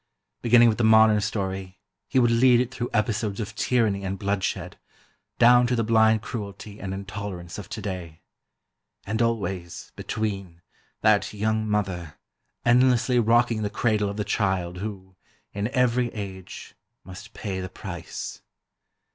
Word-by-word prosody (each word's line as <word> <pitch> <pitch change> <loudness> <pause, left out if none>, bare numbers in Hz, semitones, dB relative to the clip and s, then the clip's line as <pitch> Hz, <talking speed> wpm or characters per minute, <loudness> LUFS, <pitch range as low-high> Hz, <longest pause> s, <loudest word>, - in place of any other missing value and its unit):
Beginning 120 0 +6
with 115 0 +1
the - - +2
modern 110 -1 +6
story, 95 -3 -3 0.3
he 135 - -1
would 120 -2 +4
lead 120 +1 +5
it 125 +1 -1
through 125 -2 -3
episodes 105 -2 -1
of 110 0 -4
tyranny 110 -4 +1
and 95 0 -3
bloodshed, 95 -2 -2 0.6
down 120 +1 +6
to 125 - +1
the 115 - +1
blind 110 -1 +3
cruelty 105 -2 -7
and 95 - -5
intolerance 95 -2 -6
of 100 - -9
today. 90 -6 -6 0.8
And 110 +3 -1
always, 95 -7 -2
between, 95 -6 -4 0.4
that 110 -2 +3
young 110 +1 0
mother, 95 -6 -2 0.5
endlessly 125 0 +4
rocking 115 0 +3
the 105 - -1
cradle 105 -1 0
of 100 - -6
the 105 - -1
child 95 -3 -1
who, 95 -2 -7 0.4
in 100 +1 -1
every 125 -1 +1
age, 95 -3 -8 0.3
must 100 +4 -11
pay 95 -3 -4
the 95 - -5
price. - - -7
105 Hz, 140 wpm, -25 LUFS, 95-115 Hz, 0.8 s, Beginning